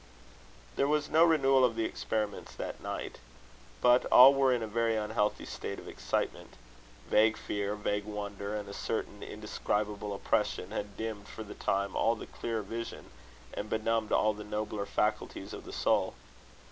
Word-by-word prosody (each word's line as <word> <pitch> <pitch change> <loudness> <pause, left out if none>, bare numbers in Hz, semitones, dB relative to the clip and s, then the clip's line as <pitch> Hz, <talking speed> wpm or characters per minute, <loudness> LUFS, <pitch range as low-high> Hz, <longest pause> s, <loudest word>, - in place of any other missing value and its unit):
There 140 - +3
was 150 0 +1
no 160 +1 +6
renewal 135 -5 +5
of 120 -3 +3
the 115 -1 0
experiments 105 -2 -3
that - - -5
night. - - -5 0.6
But 125 +1 +5
all 130 +2 +9
were 135 -1 +3
in 120 -2 +1
a - - -3
very 115 +1 +1
unhealthy 105 -1 0
state - - -5
of - - -10
excitement. - - -3 0.5
Vague 110 +1 +4
fear, 100 0 -2
vague 105 -1 -1
wonder, 100 -1 -4
and 105 -1 -5
a 100 - -7
certain - - -3
indescribable 105 0 -2
oppression, 100 -1 0
had 105 -2 -5
dimmed 110 -2 -4
for 110 - -7
the 105 - -9
time 100 0 -1
all 115 +1 +3
the - - -8
clearer 115 -2 -3
vision, 115 +4 -6 0.4
and 105 - -4
benumbed 110 0 0
all 110 0 +3
the 105 0 -8
nobler 105 -1 -3
faculties 105 +1 -1
of - - -8
the - - -8
soul. - - +1
110 Hz, 165 wpm, -31 LUFS, 105-115 Hz, 0.6 s, all